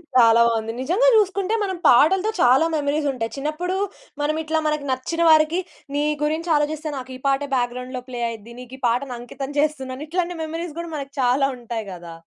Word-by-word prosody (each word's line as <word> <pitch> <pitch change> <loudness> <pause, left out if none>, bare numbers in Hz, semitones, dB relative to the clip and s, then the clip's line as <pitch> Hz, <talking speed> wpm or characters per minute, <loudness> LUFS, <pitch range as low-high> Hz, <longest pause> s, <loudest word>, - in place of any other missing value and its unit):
చాలా 230 -2 +6
బావుంది. 225 -1 -1
నిజంగా 365 - +2
చూసుకుంటే, 400 -1 +2
మనం 380 -2 -2
పాటలతో 370 - +5
చాలా 255 +6 +5
మెమోరీసుంటాయి. 285 -6 -1
చిన్నప్పుడూ, 310 +6 -2 0.4
మనమిట్లా 315 +2 0
మనకి 300 -1 -1
నచ్చిన 260 +6 -2
వారికి, 315 +2 +5 0.4
నీ 290 - +1 0.2
గురించాలోచిస్తే 310 -1 0
నాకు 260 0 -7
ఈ - - -21
పాటే 275 +1 +1
బ్యాక్‌గ్రౌండ్‌లో 250 +1 -2
ప్లే 245 -1 -5
అయి‌ద్ది. 230 0 -9
నీకు 250 +1 -10
ఈ - - -32
పాటను 250 +2 -1
అంకితం 270 +3 -7
చేస్తున్నాను. 275 -3 -1
ఇట్లాంటి 350 +2 -1
మెమరీస్ 325 0 -5
గూడా 340 -1 -6
మనకి 275 -1 -6
చాలా 255 +2 +3
ఉంటాయి 235 -2 -5
గదా! 170 -2 -10
285 Hz, 160 wpm, -22 LUFS, 250-320 Hz, 0.4 s, చాలా